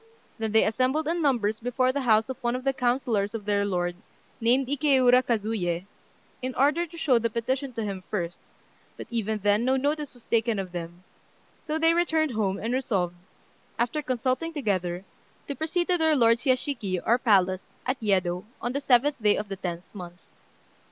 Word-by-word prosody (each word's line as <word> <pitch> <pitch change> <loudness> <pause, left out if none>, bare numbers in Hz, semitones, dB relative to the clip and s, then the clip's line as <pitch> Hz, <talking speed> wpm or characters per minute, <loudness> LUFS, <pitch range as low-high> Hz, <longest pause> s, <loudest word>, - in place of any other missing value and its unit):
Then 220 -1 -2
they 220 - +5
assembled 255 +7 +1
in 340 +1 0
numbers 230 -7 +1
before 250 +2 +1
the 280 +2 -2
house 220 -3 +3
of 260 -2 -5
one 240 0 0
of 255 - -4
the 270 0 +1
councillors 240 -5 0
of 210 -3 -6
their 205 -1 +1
lord, 175 -3 -1 0.4
named 245 +4 +3
Ikéura 260 -2 +4
Kazuyé, 205 -7 -1 0.6
in 255 0 -4
order 300 +6 +2
to 335 +1 -13
show 265 -7 +3
the 230 0 0
petition 255 +4 -2
to 225 -1 -3
him 195 -3 -4
first, 175 -4 -3 0.6
but - - -7
even 220 -2 -1
then 205 +2 +3
no 260 +2 +2
notice 290 +1 -2
was 245 - -17
taken 230 -1 +1
of 190 -2 -4
them; 175 0 -7 0.6
so 310 0 -2
they 325 +1 +4
returned 320 -3 +1
home, 200 -4 -1
and 230 +3 -3
resolved, 195 -9 -1 0.6
after 240 +6 0
consulting 260 +4 -1
together, 190 - -2 0.4
to 280 - -2
proceed 325 +4 -1
to 360 -1 +2
their 320 -1 +4
lord's 230 -1 +3
yashiki, 255 -8 0
or 235 +2 +3
palace, 190 -5 +2 0.2
at 255 0 -2
Yedo, 185 -4 +1 0.2
on 245 - -3
the 280 - -2
seventh 270 0 +3
day 210 -1 +4
of 205 -1 -4
the 195 - -3
tenth 175 -2 -5
month. 175 -3 -9
235 Hz, 185 wpm, -26 LUFS, 205-270 Hz, 0.6 s, they